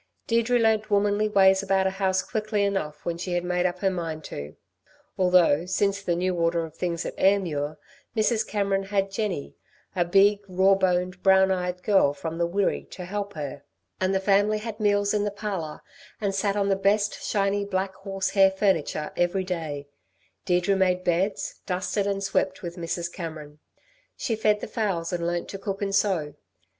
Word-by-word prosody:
Deirdre 235 +1 +2
learnt 220 -2 +2
womanly 205 +1 +2
ways 190 -2 +5
about 195 -1 +1
a 190 - +2
house 190 -1 0
quickly 215 -2 -1
enough 155 -7 -2
when 170 -1 -2
she 180 0 -3
had 175 0 0
made 180 0 +1
up 175 0 -4
her 195 - +3
mind 165 -3 -4
to. 70 - -7 0.6
Although 180 -3 +4
since 200 +1 0
the 175 -3 0
new 185 +1 0
order 170 -1 +1
of 160 -1 -13
things 170 -1 -2
at - - -4
Ayrmuir, 160 -7 +1 0.4
Mrs. 220 +1 +2
Cameron 195 -2 0
had 195 0 0
Jenny, 195 -8 -3 0.4
a 175 - +3
big, 195 +3 +4
raw 190 +1 +4
boned, 185 -1 0
brown 190 0 +5
eyed 180 -1 -2
girl 190 -9 +3
from 165 +3 -5
the 170 - +2
Wirree, 195 +3 -1
to 180 - -8
help 200 +2 -4
her, 145 -3 -6 0.4
and 185 0 +1
the - - +3
family 205 +2 +3
had 215 0 -6
meals 205 -1 +2
in 210 -1 +1
the 205 - 0
parlour, 200 -7 -5 0.4
and 200 -2 -1
sat 195 +1 0
on 200 -1 +1
the 195 - +3
best 205 +2 +1
shiny, 200 0 0
black 190 -1 -2
horse 195 0 -3
hair 195 -1 +6
furniture 190 -6 0
every 175 +2 +1
day, 160 -6 -4 0.6
Deirdre 180 +2 +2
made 185 -1 +2
beds, 185 +3 -1
dusted 190 +2 -1
and 200 0 -1
swept 195 -1 -1
with 170 -1 -5
Mrs. 170 0 -4
Cameron. 155 -4 -7 0.6
She 225 - -1
fed 210 -1 +2
the - - -4
fowls 190 -7 -2
and 170 -1 -1
learnt 175 0 -2
to 195 - -6
cook 195 0 -4
and 195 -1 -2
sew. 185 -7 +1
190 Hz, 185 wpm, -26 LUFS, 175-200 Hz, 0.6 s, hair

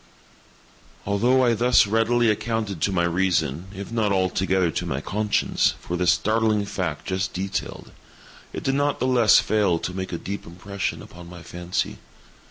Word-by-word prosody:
Although 120 +6 +3
I 120 - +3
thus 120 +2 +4
readily 115 +2 +2
accounted 105 -5 -3
to 100 - +1
my 90 -2 +1
reason, 85 -3 0
if 100 +2 -8
not 110 -3 0
altogether 95 -1 +1
to - - -3
my - - -2
conscience, 105 +1 0
for 90 - -5
the 90 0 -1
startling 105 +4 +2
fact 90 -7 -4
just 95 0 -2
detailed, 95 +1 -4 0.6
it - - -6
did 135 - 0
not 145 +1 0
the - - 0
less 125 -4 +5
fail 105 -6 +1
to 90 - -5
make 95 0 -5
a 85 - -2
deep 100 +4 -6
impression 95 +3 -5
upon 85 0 -12
my 85 -1 -11
fancy. 90 +1 -3
100 Hz, 165 wpm, -24 LUFS, 90-110 Hz, 0.6 s, less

